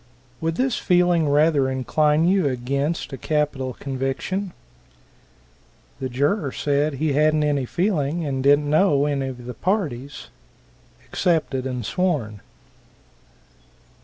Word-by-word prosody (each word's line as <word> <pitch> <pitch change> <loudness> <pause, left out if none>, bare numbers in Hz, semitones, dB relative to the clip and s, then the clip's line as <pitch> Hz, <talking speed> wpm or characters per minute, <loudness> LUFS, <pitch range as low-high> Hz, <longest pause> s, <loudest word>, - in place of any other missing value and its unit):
"Would 165 0 -1
this 255 +3 0
feeling 175 -4 +3
rather 145 -2 +3
incline 150 +4 +1
you 185 -4 +3
against 140 +5 -2
a 135 - -6
capital 145 -4 -1
conviction?" 135 +9 -3 1.5
The 130 - -3
juror 145 - 0
said 145 +2 0
he 150 +1 0
hadn't 155 +1 +3
any 145 -3 0
feeling, 170 - -1
and 135 -2 -2
didn't 145 +2 +4
know 150 -2 +3
any 140 -2 -1
of 125 -2 -8
the 125 - -6
parties. 145 - -3 0.8
Accepted 150 -7 0
and 125 -3 -4
sworn. 135 - -1
145 Hz, 115 wpm, -23 LUFS, 135-165 Hz, 1.5 s, didn't